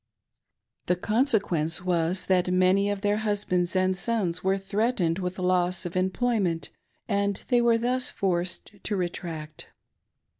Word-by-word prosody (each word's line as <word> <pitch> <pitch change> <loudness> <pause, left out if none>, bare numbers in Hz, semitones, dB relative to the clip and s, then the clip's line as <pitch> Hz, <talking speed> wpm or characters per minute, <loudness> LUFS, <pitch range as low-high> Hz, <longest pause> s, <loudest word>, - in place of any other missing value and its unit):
The 180 - +3
conse 225 +6 +2
quence 165 -3 -2
was 180 +1 +1
that 180 -1 +2
many 185 +2 +3
of 205 -1 -2
their 205 0 +1
husbands 200 -4 -1
and 185 0 +2
sons 180 -3 -1
were 190 +1 +2
threatened 195 -3 0
with 180 0 -3
loss 180 -1 +1
of 175 - -5
employment, 185 -2 0 0.4
and 200 -1 0
they 245 -1 +4
were 235 -1 +4
thus 250 +2 +1
forced 185 +2 -3
to 210 - -1
retract. 165 -4 -5
185 Hz, 140 wpm, -26 LUFS, 180-205 Hz, 0.4 s, they